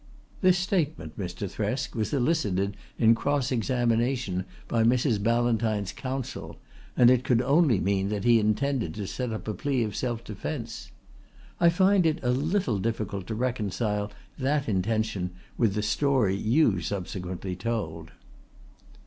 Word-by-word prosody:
"' - - -27
This 185 -2 +5
statement, 165 - -1
Mr. 90 +1 -4
Thresk, 110 +9 -2
was 110 -3 -2
elicited 115 - +1 0.2
in 115 0 +6
cross 140 +2 0
examination 120 -4 0 0.2
by 115 - +1
Mrs. 120 -2 +2
Ballantyne's 115 -3 +1
counsel, 130 +2 -5 0.4
and 120 0 +7
it 130 -1 +3
could 120 -3 +3
only 135 - +3
mean 95 +1 0
that 105 -2 -2
he 120 -1 +5
intended 110 - 0
to 105 -1 -4
set 125 +5 -3
up 110 - -5
a 110 - -1
plea 135 0 0
of 105 -3 -4
self 120 -2 -2
defence. 105 -3 -6 0.7
I 170 - +6
find 185 +1 +4
it 155 - +1
a 125 - +2
little 140 - 0
difficult 100 -3 -3
to 110 - -3
reconcile 105 -3 -1 0.3
that 140 +1 0
intention 100 -2 -1 0.2
with 110 -4 +1
the 105 - 0
story 110 -2 +2
you 110 - +2
subsequently 90 0 -4
told." 90 -6 -3
115 Hz, 145 wpm, -27 LUFS, 100-130 Hz, 0.7 s, and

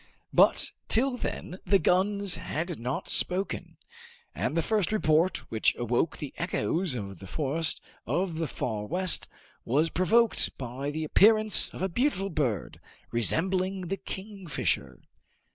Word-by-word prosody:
But - - +4 0.2
till 250 +3 +2
then 185 -6 -5
the 195 +2 +4
guns 195 +2 +1
had 170 0 -4
not 125 +3 -3
spoken, 185 +2 -1 0.6
and 165 - -2
the 165 - +2
first 210 -2 +1
report 170 -4 +2
which 110 - +2
awoke 120 +6 0
the 145 - -6
echoes 170 -2 -1
of 100 -6 -6
the 95 - -10
forest 155 - 0 0.3
of 175 -2 -1
the 165 - -1
Far 110 -5 -3
West 185 +2 +1 0.3
was 150 +7 +1
provoked 225 +6 +2
by 130 +2 -4
the 155 +2 -3
appearance 215 +6 +5
of - - -6
a - - +2
beautiful 195 - 0
bird, 125 - -2 0.3
resembling 185 - 0
the 195 - -1
kingfisher. 195 -3 -3
175 Hz, 135 wpm, -28 LUFS, 145-195 Hz, 0.6 s, appearance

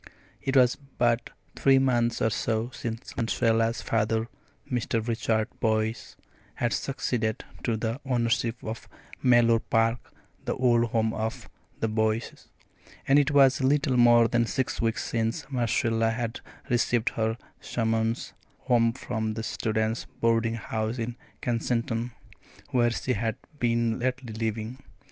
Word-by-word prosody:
It 135 0 +1
was 125 -1 +5 0.2
but 120 0 +2 0.3
three 135 -1 +4
months 120 -3 +2
or 110 - +2
so 110 +3 -1
since 115 0 -6
Marcella's 115 0 +1
father, 110 0 0 0.4
Mr. 115 -2 -1
Richard 110 -2 0
Boyce, 110 0 -1 0.4
had 120 -1 0
succeeded 120 -5 -2 0.2
to 115 -3 0
the 115 +4 -3
ownership 120 -2 +1
of 110 +1 -6 0.3
Mellor 120 -2 +5
Park 115 +1 0 0.3
the - - -2
old 120 -2 +3
home 110 -1 0
of 110 +1 -4 0.3
the 115 - +2
Boyces, 110 +1 -1 0.6
and 140 +2 +6
it 145 0 +2
was 135 -2 +5
little 140 0 +2
more 120 -1 +6
than 120 0 +1
six 130 +1 -1
weeks 115 -1 0
since 115 +6 -1
Marcella 115 -2 +1
had 115 0 -3 0.3
received 120 -1 +2
her 110 0 -1 0.2
summons 115 0 -1 0.3
home 115 -2 +3
from 110 -3 -3
the 110 - -4
students' 110 +3 -1
boarding 115 0 +2
house 110 +1 -3
in 115 0 -3 0.3
Kensington, 115 0 -1 0.6
where 120 -2 +3
she 125 +2 -1
had 110 +1 -1 0.2
been 115 -1 +1
lately 125 -2 -2
living. 110 +2 -3
115 Hz, 130 wpm, -27 LUFS, 110-120 Hz, 0.6 s, and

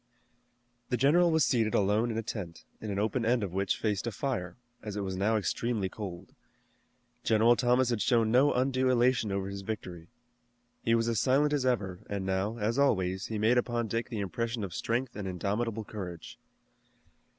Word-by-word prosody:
The 125 - +1
general 160 +8 +4
was 160 -2 +3
seated 110 -4 +1
alone 105 +4 +2
in 110 - -3
a 115 - -2
tent, 95 -7 -6 0.2
an 105 -2 -4
open 110 +4 0
end 120 0 +2
of 95 -3 -4
which 95 +1 0
faced 105 0 -1
a - - -1
fire, 95 -5 -3 0.2
as 105 -2 -6
it 105 - -2
was 95 -1 -3
now 105 +4 +1
extremely 110 -1 -1
cold. 95 -4 -8 0.9
General 115 +2 +4
Thomas 125 0 +2
had 115 -3 -1
shown 115 -3 +2
no 130 +4 +5
undue 130 0 +1
elation 120 -3 +2
over 95 0 -2
his 100 0 -6
victory. 90 -5 -6 0.7
He 115 - +2
was 115 0 +1
as 115 -3 +1
silent 145 +4 +3
as 135 -3 +1
ever, 95 -8 -1
and 100 -2 -3
now, 95 +4 -1
as 115 +4 0
always, 95 -8 +1
he 110 - -3
made 115 +4 +3
upon 120 -1 -1
Dick 115 +3 -2
the 110 -4 -3
impression 115 +3 -3
of 95 -4 -5
strength 120 +7 -2
and 100 -2 -4
indomitable 105 +5 -2
courage. 90 -6 -8
110 Hz, 185 wpm, -30 LUFS, 100-120 Hz, 0.9 s, no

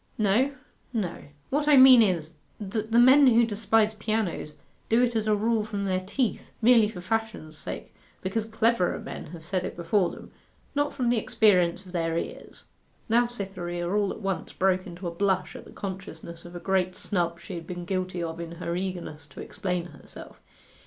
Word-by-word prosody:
'No 230 +7 +2 0.4
no. 195 -7 -3 0.3
What 290 +2 0
I 295 -2 +7
mean 260 -2 +9
is, 170 -6 0 0.2
that 215 +2 -4
the 230 - +3
men 260 +4 +7
who 235 -1 +5
despise 220 0 +2
pianos 210 -8 -2 0.3
do 225 - +4
it 240 -1 +1
as 220 -1 0
a 215 - +4
rule 220 +1 +1
from 205 -2 -3
their 185 -1 +1
teeth, 225 +5 -2
merely 230 -2 +5
for 180 -5 -8
fashion's 220 -5 -3
sake, - - -7 0.3
because 215 +4 -2
cleverer 225 -4 +1
men - - -7
have 165 -2 -11
said 185 +1 -1
it - - -5
before 175 +2 +1
them - - -11 0.4
not 290 0 +1
from 250 -3 -1
the 240 - +2
experience 185 -4 +2
of 180 - -12
their 165 -2 -1
ears.' - - -6 0.5
Now 240 +2 +4
Cytherea 185 -6 -4
all 200 +2 +1
at - - -8
once 195 -2 -3
broke 185 -1 +1
into 175 +1 -7
a - - -3
blush 190 0 0
at - - -9
the - - -13
consciousness 175 -4 -7
of 175 0 -11
a - - -5
great 185 -1 0
snub 170 -3 -1
she 185 - -9
had 170 -2 -7
been 175 -1 -6
guilty 185 -1 -2
of 165 0 -5
in 170 0 -6
her 170 0 -4
eagerness 175 -5 -5
to 140 - -13
explain 180 -3 -3
herself. 175 - -13
195 Hz, 190 wpm, -27 LUFS, 175-225 Hz, 0.5 s, mean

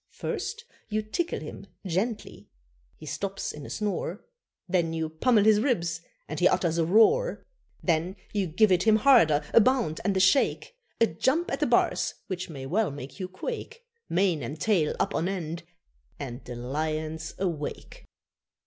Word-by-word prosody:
First 445 +3 -4 0.2
you 215 0 -1
tickle 340 +11 -2
him - - -9 0.2
gently, 195 +6 -3 0.5
he 155 - -11
stops 195 +6 -3
in 150 -1 -9
a - - -9
snore, 205 -1 -3 0.4
Then 175 -3 +1
you 160 -1 -2
pummel 210 +7 +3
his 215 0 +5
ribs 170 - 0 0.3
and - - -4
he - - +6
utters 170 -1 +1
a 165 - +3
roar. 445 - +4 0.4
Then 170 +2 +1 0.2
you 200 -3 0
give 195 +6 +3
it 180 -1 +4
him 220 +2 +5
harder 215 - +5
a - - +8
bound 240 -10 +1
and 195 0 +1
a - - +3
shake, 190 - +2 0.2
A 230 - +6
jump 265 - 0
at - - -1
the - - +2
bars - - +2
which 185 -4 -5
may 135 -4 -7
well 200 +8 +1
make 135 -1 -9
you 185 - -3
quake, 465 - -6 0.3
Mane 175 -4 +2
and 140 +6 -6
tail 180 -9 +2
up - - 0
on 170 +3 0
end 170 -3 -4 0.6
and 125 -2 -6
the 125 - -7
lion's 155 +5 -3
awake. 170 -6 -4
185 Hz, 165 wpm, -27 LUFS, 160-220 Hz, 0.6 s, a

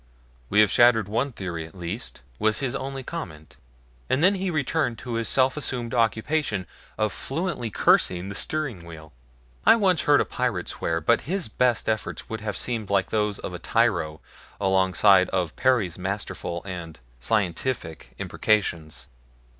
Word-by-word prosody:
"We 105 - +5
have 105 - +4
shattered 120 -4 +5
one 115 +7 -1
theory 90 -7 -5
at 80 +2 -13
least," 90 - -6 0.2
was 110 0 +2
his 135 -3 -2
only 135 0 -4
comment, 80 - -7 0.5
and 135 +5 +2
then 190 +3 +6
he 190 -1 -2
returned 150 -5 0
to 120 +1 -6
his 115 0 0
self 130 0 +3
assumed 125 -5 -2
occupation 115 -2 0 0.3
of 110 -1 0
fluently 150 -5 -3
cursing 90 -2 +2
the 100 - -5
steering 135 - -1
wheel. 80 -3 -11 0.5
I - - +7
once 190 -6 +2
heard 145 -1 +4
a - - +2
pirate - - -2
swear, 80 0 -2
but 80 - +1
his 185 - -2
best 120 +1 +1
efforts 110 -1 -2
would 110 -1 -5
have 105 -2 -3
seemed 115 -5 -2
like 100 -2 +1
those 105 -2 0
of - - -6
a 90 - -6
tyro 85 -7 0 0.4
alongside 95 0 +4
of 90 -4 -1
Perry's 115 -10 +1
masterful 95 -2 -4
and 85 -4 -7 0.2
scientific 85 - -2
imprecations. 85 -10 -1
110 Hz, 155 wpm, -25 LUFS, 90-130 Hz, 0.5 s, I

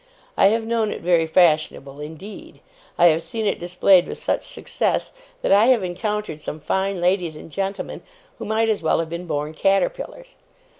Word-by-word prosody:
I - - +5
have 225 +2 +1
known 225 -1 0
it - - -5
very 170 -2 +3
fashionable 155 -5 +2
indeed. 160 +8 -10 0.4
I 175 - +7
have 160 +1 +1
seen 215 +7 -4
it 200 - 0
displayed 180 +1 +4
with - - -6
such - - -1
success, - - -2 0.3
that - - +1
I 205 +3 +6
have 250 -6 +4
encountered 195 -2 -3
some 155 - -5
fine 190 +5 -1
ladies 175 -2 +1
and 155 - -11
gentlemen 195 +3 -4 0.4
who 225 - -5
might 220 +1 +1
as 220 -2 0
well 160 - +2
have 165 -1 -3
been 170 +1 -5
born 150 0 -3
caterpillars. 195 - -1
180 Hz, 180 wpm, -22 LUFS, 160-210 Hz, 0.4 s, I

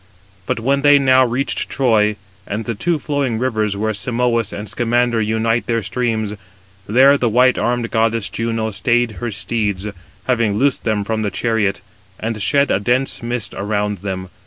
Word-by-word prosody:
But - - -1
when 135 +4 +1
they 145 0 +6
now 130 -1 +5
reached 130 +3 -1
Troy, 110 -5 +2 0.3
and 105 +2 -4
the 115 - -2
two 165 +10 0
flowing 140 -6 -1
rivers, 110 -5 -1
where 110 +1 -1
Simois 115 0 0
and 105 +1 -6
Scamander 120 0 +1
unite 110 +2 0
their 115 -2 0
streams, 110 -2 -2 0.5
there 135 +6 +5
the 120 - +1
white 125 +3 +3
armed 120 -1 -1
goddess 115 -2 +1
Juno 115 -1 -2
stayed 120 +2 0
her 120 - -2
steeds, 105 -2 -2 0.4
having 115 -4 +1
loosed 135 +3 +1
them 110 -2 0
from 110 +1 -2
the 105 - 0
chariot, 105 -1 0 0.4
and 110 -1 -3
shed 140 +6 +2
a - - +2
dense 125 +7 0
mist 120 -1 -3
around 105 -1 -2
them. 95 -1 -5
115 Hz, 165 wpm, -18 LUFS, 105-125 Hz, 0.5 s, they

